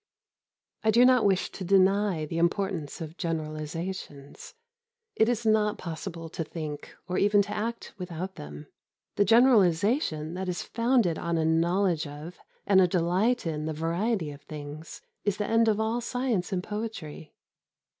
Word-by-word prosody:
I 220 - +2
do 235 +3 +6
not 255 -3 +5
wish 195 -2 +2
to 190 - -7
deny 195 -2 +3
the 165 +2 -3
importance 170 -3 -1
of 160 +1 -7
generalisations. 155 - -5 0.6
It 220 +1 +3
is 240 -1 -1
not 215 -1 +2
possible 165 0 -6
to 165 - -4
think 155 -2 -7
or 180 0 -1
even 205 0 +4
to 205 - -8
act 230 +2 -4
without 180 +1 -5
them. 75 - -9 0.5
The 205 - +3
generalisation 200 - +3
that 185 +1 -3
is 180 - -3
founded 230 -8 +1
on 170 0 -1
a 160 - +1
knowledge 170 0 +1
of 150 +5 -9 0.3
and 190 -2 +5
a 180 - +5
delight 180 +7 +1
in 155 -2 -2
the 160 - -2
variety 165 +2 -1
of 140 0 -11
things 150 +1 -9 0.2
is 205 -1 0
the 210 - -1
end 225 +1 +3
of 215 -1 +2
all 225 +2 0
science 240 -6 -1
and 180 -2 -1
poetry. 210 -9 -6
180 Hz, 155 wpm, -27 LUFS, 160-210 Hz, 0.6 s, do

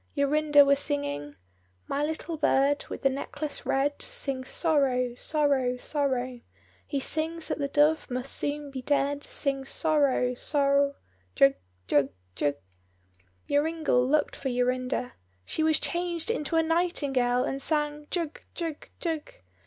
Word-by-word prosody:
Jorinda 290 0 +5
was 280 0 +4
singing— 145 - -3 0.5
"My 285 - -1
little 315 +2 -3
bird, 285 -1 +2
with - - -7
the 270 - +5
necklace 285 +2 -5
red, 285 +2 +1
Sings 275 - -3
sorrow, 265 -7 +1
sorrow, 270 -2 +1
sorrow, 255 -3 -2 0.5
He 280 - -1
sings 320 +4 0
that - - -2
the 280 - 0
dove 300 +3 +2
must 250 +1 -3
soon 290 0 -2
be 265 -1 -5
dead, 285 +1 0
Sings 270 -1 -2
sorrow, 285 -6 +2
sor—jug, 250 - +1 0.3
jug, 140 +3 +3 0.2
jug." 145 +9 0 0.9
Joringel 300 -3 +2
looked 290 +3 +1
for 270 - -3
Jorinda. 250 0 -1 0.3
She - - -2
was 315 0 +3
changed 345 +2 0
into 315 -5 -2
a 325 - +4
nightingale, 285 -7 +1
and 270 0 -3
sang, 295 -1 -1
"jug, 335 -4 -3
jug, 330 -3 -5
jug." 325 -3 -3
280 Hz, 130 wpm, -28 LUFS, 255-305 Hz, 0.9 s, Jorinda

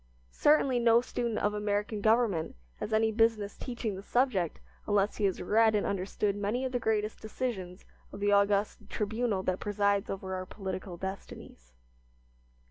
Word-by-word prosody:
Certainly, 275 -4 +3
no 235 -1 +5
student 240 -2 -2
of 205 - +1
American 210 0 -1
government 215 -7 +2 0.2
has - - -5
any 220 0 +3
business 220 -2 +1
teaching 240 -4 -4
the 190 - -7
subject 205 - 0 0.3
unless 205 0 +1
he 210 - +1
has 190 - 0
read 220 +3 +4
and 205 - +1
understood 200 +1 -1
many 210 +6 -1
of 260 - -2
the 245 - 0
greatest 215 -2 -1
decisions 205 -5 -4 0.3
of - - -8
the 205 0 +2
august 200 0 +2
tribunal 220 -2 -1
that 185 0 -1
presides 200 -1 +1
over 190 -1 -4
our 185 0 -4
political 190 -2 -6
destinies. 170 - -8
205 Hz, 155 wpm, -30 LUFS, 195-225 Hz, 0.3 s, no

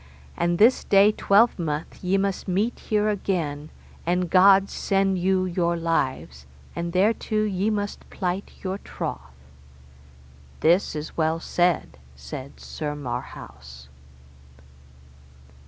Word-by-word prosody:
And 175 0 0
this 230 +6 +5
day 200 +1 +5
twelvemonth 195 -10 +1
ye 185 +2 +2
must 195 -1 -2
meet 205 +6 0
here 210 -1 0
again, 165 -8 -2 0.3
and 180 0 -1
God 195 +1 +6
send 195 -2 0
you 185 +1 +1
your 170 -1 0
lives, 130 - -2 0.3
and 170 0 -3
thereto 215 +3 +1
ye 200 0 0
must 205 -1 -4
plight 185 +1 -3
your 190 +1 -3
troth. - - -5 1.4
This 170 +3 +3
is 150 +1 -6
well 160 0 0
said, 175 - 0 0.2
said 70 - -9
Sir 150 -2 -5
Marhaus. 65 - -8
180 Hz, 110 wpm, -24 LUFS, 155-195 Hz, 1.4 s, God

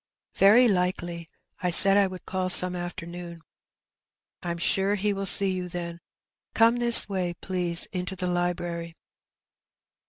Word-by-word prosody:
''Very 220 +6 +4
likely. 180 -4 -3 0.3
I 180 - -2
said 195 +3 +4
I 200 -1 +2
would 185 -1 -11
call 185 -1 -4
some 180 0 +5
afternoon.^' 175 -1 -9 1.0
'Tm 170 -1 -6
sure 195 +3 -1
he 205 +1 -2
will 195 0 -4
see 195 0 +5
you, 180 -1 -6
then. 170 -1 -7 0.6
Come 230 +2 +3
this 240 -1 +6
way, 185 -3 -4
please, 175 -2 0
into 180 +1 -5
the 185 0 -6
library. 175 -1 -4
180 Hz, 135 wpm, -24 LUFS, 175-195 Hz, 1.0 s, this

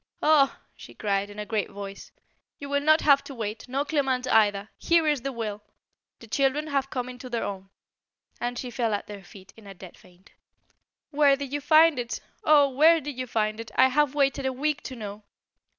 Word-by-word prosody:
"Ah!" 295 -3 +4 0.2
she - - -13
cried, 200 -1 -1
in 205 - -12
a 210 - -5
great 215 -1 -2
voice, 200 0 -9 0.5
"you 285 - -8
will 285 0 0
not 310 +2 +4
have 280 -2 +4
to 275 - -10
wait, 215 -2 -5
nor 275 +3 -1
Clement 270 -4 0
either. 205 -2 +3
Here 335 -2 +2
is 295 -4 +1
the 275 +2 -3
will! 215 -4 -5 0.6
The 230 - -14
children 275 +5 0
have 275 -3 -1
come 250 -2 -4
into 255 0 -9
their 235 -2 -2
own." 195 -1 -6 0.7
And 245 0 -3
she 250 - -5
fell 230 -3 0
at - - -5
their 205 -2 -10
feet 190 +1 -15
in 220 -2 -16
a 195 - -10
dead 180 -1 -12
faint. 180 +1 -22 0.8
"Where 285 -2 +4
did 280 -1 -7
you 290 - -2
find 310 0 +5
it? 240 -1 -4 0.2
Oh! 300 -5 +5
where 315 +5 +5
did 295 -2 -7
you 255 0 -5
find 215 -1 -1
it? 230 - -7
I 260 - +5
have 290 +1 +1
waited 275 -1 +1
a - - 0
week 295 +3 -1
to 260 - -6
know. 210 -2 -8
255 Hz, 210 wpm, -26 LUFS, 210-285 Hz, 0.8 s, find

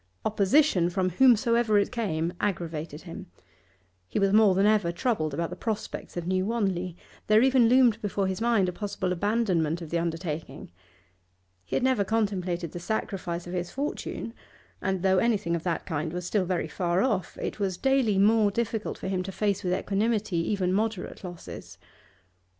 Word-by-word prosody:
Opposition, 205 - +3
from 185 +1 0
whomsoever 235 0 +4
it 200 - +1
came, 175 -8 -1
aggravated 165 -5 -3
him. 170 -2 -9 0.8
He - - -4
was 195 0 +2
more 210 -3 +6
than 195 +2 +3
ever 210 -5 +3
troubled 170 -4 -1
about 165 +4 -3
the - - -5
prospects 220 -5 -5
of 175 - -3
New 185 +1 +1
Wanley; 185 -6 -1 0.3
there 215 +2 +5
even 260 -3 +5
loomed 245 -3 +4
before 200 -1 -1
his 190 +2 -2
mind 230 -5 +3
a - - -1
possible 185 -1 -3
abandonment 180 -5 0
of 165 -3 -9
the 170 - +1
undertaking. 165 - -4 0.9
He 90 - -4
had - - +1
never 260 -5 +3
contemplated 185 -6 -1
the 175 - -6
sacrifice 180 -3 -3
of 175 - -7
his 175 -1 -2
fortune, 270 -3 -4 0.5
and 190 -2 -1
though 190 -1 +4
anything 205 -7 +1
of 170 - -3
that 170 -2 -1
kind 160 -1 -3
was 180 0 -4
still 190 0 0
very 180 0 -1
far 175 +1 0
off, 220 -8 -1
it - - -4
was 190 -3 -1
daily 265 -6 +2
more 210 +1 +4
difficult 220 0 -2
for - - -6
him 190 -1 -1
to 190 +1 -5
face 200 0 -1
with 180 - -1
equanimity 205 0 0
even 180 +2 0
moderate 215 -2 -2
losses. 175 -2 -9
190 Hz, 175 wpm, -27 LUFS, 175-220 Hz, 0.9 s, more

